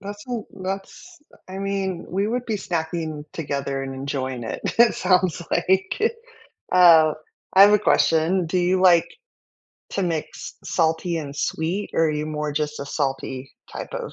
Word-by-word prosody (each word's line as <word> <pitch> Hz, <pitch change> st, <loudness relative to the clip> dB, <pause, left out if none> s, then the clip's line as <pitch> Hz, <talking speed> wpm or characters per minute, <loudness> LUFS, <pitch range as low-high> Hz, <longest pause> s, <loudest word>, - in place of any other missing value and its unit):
That's 205 Hz, +1 st, -8 dB
a -, -, -4 dB
l 225 Hz, -4 st, -4 dB, 0.2 s
that's 195 Hz, -, -6 dB
uh, -, -, -18 dB
I 190 Hz, -, -7 dB
mean, 195 Hz, -3 st, -3 dB
we 195 Hz, +3 st, -1 dB
would 245 Hz, +2 st, -2 dB
be 220 Hz, -, -1 dB
snacking 160 Hz, -4 st, -3 dB
together 140 Hz, -3 st, -3 dB
and 135 Hz, 0 st, -5 dB
enjoying 130 Hz, -2 st, -4 dB
it, -, -, -5 dB, 0.2 s
it 235 Hz, -1 st, +6 dB
sounds 180 Hz, -2 st, +1 dB
like. 190 Hz, +1 st, +1 dB, 0.8 s
Uh, 165 Hz, -4 st, +7 dB, 0.4 s
I 190 Hz, -, +7 dB
have 205 Hz, -, +7 dB
a 210 Hz, -, +5 dB
question, 165 Hz, +2 st, +2 dB
do 180 Hz, -, -1 dB
you 180 Hz, +1 st, +2 dB
like 175 Hz, -3 st, +5 dB, 0.8 s
to 195 Hz, -, -2 dB
mix 165 Hz, -4 st, -4 dB
salty 165 Hz, +1 st, 0 dB
and 145 Hz, -3 st, -6 dB
sweet 170 Hz, +7 st, -2 dB
or 165 Hz, -, +3 dB
are -, -, +1 dB
you 150 Hz, 0 st, -2 dB
more 150 Hz, -1 st, -3 dB
just 150 Hz, 0 st, -2 dB
a 140 Hz, -, -5 dB
salty 135 Hz, -2 st, -3 dB, 0.2 s
type -, -, -7 dB
of -, -, -5 dB
170 Hz, 170 wpm, -23 LUFS, 150-190 Hz, 0.8 s, Uh